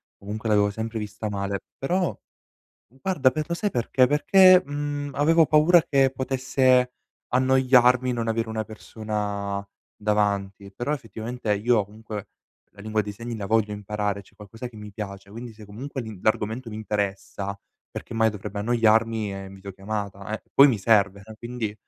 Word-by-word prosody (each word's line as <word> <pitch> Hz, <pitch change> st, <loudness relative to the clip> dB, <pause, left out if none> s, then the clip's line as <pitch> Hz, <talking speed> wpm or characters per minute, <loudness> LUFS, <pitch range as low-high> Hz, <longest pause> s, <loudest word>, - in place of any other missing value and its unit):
comunque 105 Hz, +3 st, -6 dB
l'avevo 105 Hz, -1 st, +3 dB
sempre 110 Hz, +2 st, -4 dB
vista 105 Hz, +1 st, -5 dB
male. 100 Hz, -1 st, -2 dB, 0.2 s
Però, 180 Hz, +6 st, -1 dB, 0.7 s
guarda, 135 Hz, -, +1 dB
per 155 Hz, +4 st, -2 dB
lo 170 Hz, -, -2 dB
sai 205 Hz, +3 st, -1 dB
perché? 125 Hz, +2 st, +2 dB
Perché, 185 Hz, +5 st, +6 dB
mhmm, 145 Hz, 0 st, -3 dB
avevo 160 Hz, +2 st, +4 dB
paura 155 Hz, +3 st, +6 dB
che 135 Hz, -2 st, +3 dB
potesse 130 Hz, -1 st, +2 dB, 0.3 s
annoiarmi 130 Hz, -1 st, +4 dB
non 115 Hz, -1 st, -2 dB
avere 115 Hz, 0 st, -1 dB
una 110 Hz, 0 st, -2 dB
persona 105 Hz, -2 st, -4 dB, 0.3 s
davanti. 100 Hz, -2 st, -1 dB
Però 120 Hz, +7 st, -2 dB
effettivamente 115 Hz, -4 st, -3 dB
io, 110 Hz, 0 st, +2 dB
comunque, 105 Hz, 0 st, -8 dB, 0.5 s
la 100 Hz, -, -15 dB
lingua 110 Hz, +1 st, 0 dB
dei 105 Hz, 0 st, -6 dB
segni 115 Hz, +2 st, -6 dB
la 100 Hz, -2 st, -4 dB
voglio 110 Hz, -1 st, +2 dB
imparare, 105 Hz, 0 st, -3 dB
cioè -, -, -23 dB
è -, -, -29 dB
qualcosa 110 Hz, +4 st, -9 dB
che 120 Hz, -, -21 dB
mi 105 Hz, -1 st, -9 dB
piace. 100 Hz, -1 st, -8 dB
Quindi 115 Hz, +2 st, -8 dB
se 110 Hz, 0 st, -13 dB
comunque 130 Hz, +7 st, -6 dB
l'in 110 Hz, -4 st, -8 dB
l'argomento 110 Hz, +3 st, 0 dB
mi 105 Hz, -, -6 dB
interessa, 100 Hz, -2 st, -3 dB, 0.3 s
perché -, -, -8 dB
mai 115 Hz, 0 st, +3 dB
dovrebbe 105 Hz, 0 st, -6 dB
annoiarmi 115 Hz, -1 st, +2 dB
e 95 Hz, -, -6 dB
in 95 Hz, -, -11 dB
videochiamata, 100 Hz, +1 st, -5 dB
eh. -, -, -17 dB
Poi 140 Hz, +1 st, +8 dB
mi 125 Hz, -, +2 dB
serve, 100 Hz, -1 st, +2 dB
eh, 110 Hz, -, -11 dB
quindi, 120 Hz, -3 st, -4 dB
110 Hz, 165 wpm, -25 LUFS, 105-130 Hz, 0.7 s, Poi